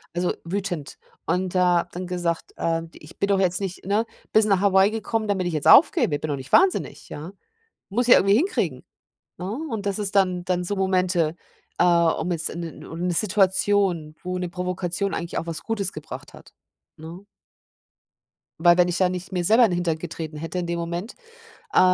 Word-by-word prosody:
so, 175 0 0
also - - 0
wütend. 175 -4 -4 0.3
Und 180 +3 -1
da 180 -1 +4
habe - - -4
dann 180 +1 -6
gesagt, 175 -2 -2
äh, 165 0 -1
ich 150 - -15
bin 200 - +1
doch 200 -1 +2
jetzt 180 -2 +1
nicht, 190 -2 -5
ne, 210 +3 +1 0.3
bist 220 0 +4
nach 195 -3 +2
Hawaii 195 0 +4
gekommen, 225 0 -2
damit 190 -3 0
ich 175 - -3
jetzt 155 0 -1
aufgebe. 230 - +6
Bin 155 - -4
doch 145 - 0
nicht 130 0 -10
wahnsinnig, 380 +1 +2
ja? 155 +5 -7 0.6
Muss 240 +5 0
ja 245 - +8
irgendwie 195 +1 +4
hinkriegen, 355 - -1 0.5
ne? 180 +2 -5 0.2
Und 220 -6 -4
das 200 0 -1
ist 205 -1 -1
dann 185 -2 +2
dann 180 -1 -1
so 205 +3 -2
Momente, 180 -4 +1 0.4
äh, - - +4
um 170 -1 +2
jetzt 165 -2 0
'n 170 - -6
'ne 165 -2 -8
o - - -7
'ne 175 +2 -1
Situation, 190 -4 +1
wo 180 0 -3
'ne 180 -1 -3
Provokation 180 +1 -3
eigentlich 170 0 -4
auch - - -4
was 165 -1 -5
Gutes 205 -4 -1
gebracht 155 - -9
hat, - - -15 0.4
ne? 165 +5 -10 1.4
Weil 175 +1 +5
wenn 180 0 +4
ich 175 0 -1
da 185 - +3
nicht 180 +1 -6
mir 180 -2 -1
selber 225 +7 +5
in 210 - 0
Hintern 175 -2 -1
getreten 160 -2 -6
hätte 165 +4 -5
in 175 - -3
dem 170 0 -2
Moment, 170 +6 -5 0.6
äh, - - +5
180 Hz, 200 wpm, -24 LUFS, 170-195 Hz, 1.4 s, ja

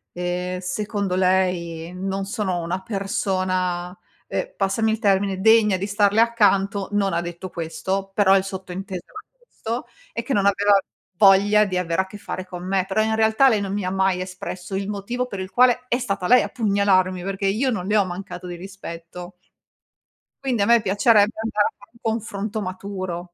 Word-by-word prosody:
ehm, 180 +1 -3
secondo 200 0 -2
lei 180 -3 0
non 195 +1 -3
sono 195 -4 -2
una 170 +3 -3
persona, 185 -3 -2 0.3
ehm, - - -3
passami 220 +3 +1
il 220 - -1
termine, 195 -3 +1
degna 220 -2 +5
di 195 +2 -3
starle 205 +1 +2
accanto. 200 -4 +2
Non 200 -3 +1
ha 170 - +1
detto 175 +2 -7
questo, 190 +4 -3
però 195 -1 +5
il 190 - +3
sottinteso 190 -1 -6
era 425 - -10 0.3
questo 235 - -5 0.2
e - - -3
che 275 - -2
non 200 -3 +2
aveva 200 0 +4 0.4
voglia 205 +1 +6
di 185 -2 -2
avere 175 0 0
a 190 - -6
che 205 - -10
fare 185 -2 -6
con 180 -1 -8
me. 190 -1 +1
Però 210 +2 +1
in 220 0 +1
realtà 220 +4 +4
lei 220 -5 +3
non 195 -1 -3
mi 205 -2 -2
ha 185 - -1
mai 190 -1 +1
espresso 185 0 -6
il 195 +1 -2
motivo 235 +5 -3
per 200 -5 -6
il 185 0 -5
quale 250 +4 +3
è 245 - +1
stata 200 -7 -2
lei 250 +4 +6
a - - -3
pugnalarmi 195 -5 +1
perché 195 0 -3
io 225 +7 +1
non 190 -7 -2
le 210 - +1
ho 205 - +5
mancato 180 0 -7
di 175 - -6
rispetto. 175 -1 -9 1.1
Quindi 240 -6 +1
a - - +2
me 235 0 +5
piacerebbe 210 +2 +4
andare 215 -2 +1
a - - -8
fare 200 - -18
un 235 - -22
confronto 220 -1 -3
maturo. 185 -2 -5
195 Hz, 190 wpm, -22 LUFS, 185-210 Hz, 1.1 s, voglia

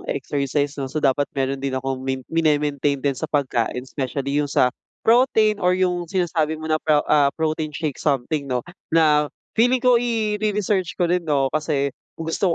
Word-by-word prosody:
exercise 140 +1 -1
'no, 135 - -3
so 150 +3 -3
dapat 140 +1 +2
mayro'n 135 0 -1
din 135 -1 -2
akong 130 0 -3
min 130 -1 -3
min 165 -1 +2
e-maintain 145 -1 +1
din 140 +1 0
sa 155 +4 -5
pagkain, 125 -4 -1
specially 140 +2 -2
yung 145 - -2
sa 125 -2 +2 0.3
protein 220 -3 +4
or 180 0 +2
yung 180 -2 0
sinasabi 165 -4 0
mo 155 - -9
na 155 - +1
pro 150 -1 +2
ah, 145 -2 +5
protein 155 -1 -2
shake 155 -5 -3
something 140 0 -1
'no, 125 -2 -1 0.2
na 150 -2 +3 0.2
feeling 245 +3 +3
ko 250 -2 +4
ire-research 210 -5 -1
ko 180 - +1
rin 180 - +2
'no 135 -3 +1
kasi 145 -3 0 0.2
gusto 165 +4 -2
150 Hz, 175 wpm, -22 LUFS, 135-175 Hz, 0.3 s, ah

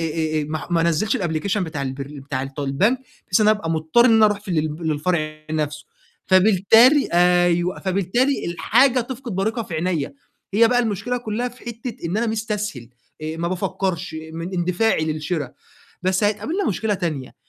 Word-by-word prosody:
آآ 160 -1 -1
آآ 150 - -2
ما 155 - -2
ع - - -8
ما 170 -1 +2
أنزّلش 170 +6 +1
الأبليكيشن 185 +3 -1
بتاع 150 -4 -5
البرن 140 +2 -6
بتاع 135 -1 -4
الط 135 +2 -6
البنك، 185 - +1 0.3
بحيث 180 - +1
إن 215 - +5
أنا 215 - +4
أبقى 165 -5 -4
مضطر 160 +8 +3
إن 230 - +5
أنا 220 - +6
أروح 210 -1 0
في 205 - -15
ال - - 0
للب 155 +1 -2
للفرع 155 0 -1
نَفْسه، 150 -1 -2 0.4
فبالتالي 220 +8 +5
أيوه، 175 0 +3
فبالتالي 200 +9 0
الحاجة 240 +10 +3
تفقد 245 0 -6
بريقها 220 +5 -1
في 180 -6 -7
عينيّا، 165 -3 -1 0.4
هي 230 +2 +6
بقى 245 0 +2
المشكلة 225 +1 -1
كلّها 235 +1 -3
في 245 +1 -17
حتّة 235 0 -6
إن 175 - -2
أنا 235 +2 +1
مستسهل، 210 - -3 0.3
آآ 155 +1 -4
ما 170 +1 -2
بافكّرش 180 -1 -2 0.2
من 165 +3 -5
اندفاعي 180 +1 +1
للشِرا، 155 -2 -3 0.5
بس 185 +2 +1
هتقابلنا 310 - 0
مشكلة 215 +1 0
تانية، 155 -8 -4
180 Hz, 180 wpm, -22 LUFS, 155-220 Hz, 0.5 s, أنا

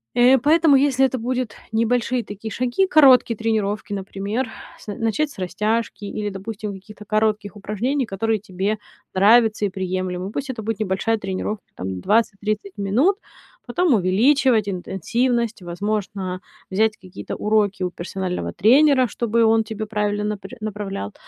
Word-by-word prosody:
Э, 250 +2 +6
поэтому 310 +2 +5
если 270 -1 +3
это 260 0 -1
будет 250 0 -2 0.2
небольшие 240 +2 +1
такие 205 +2 -7
шаги, 255 - +1
короткие 260 -7 +6
тренировки, 215 -2 -1
например: 200 +5 -3 0.3
с - - -16
начать 225 +8 0
с 285 - -15
растяжки 210 +4 -2
или, 210 +1 -3
допустим, 205 +1 -6
какие-то 210 +2 -12
коротких 215 -1 0
упражнений, 235 +7 -1
которые 220 +1 -1
тебе 195 +1 -2 0.4
нравятся 215 +2 +4
и - - 0
приемлемы. 185 0 -3
Пусть 275 +3 -4
это 235 -4 -5
будет 220 0 -3
небольшая 215 +2 0
тренировка, 195 +1 -4
там, 95 0 -4
20-30 210 - 0
минут, 240 - +2 0.5
потом 355 -5 +2
увеличивать 220 +4 +3
интенсивность. 230 +5 -1
Возможно, 190 +1 -3 0.3
взять 220 +3 +2
какие-то 185 -1 -8
уроки 210 -3 +1
у 180 - -1
персонального 180 +1 -4
тренера, 260 +5 +5
чтобы 235 +1 0
он 225 0 +4
тебе 215 0 -5
правильно 210 -1 -1
напрь 210 +3 -5
направлял, 200 - -5
215 Hz, 140 wpm, -22 LUFS, 195-235 Hz, 0.5 s, Э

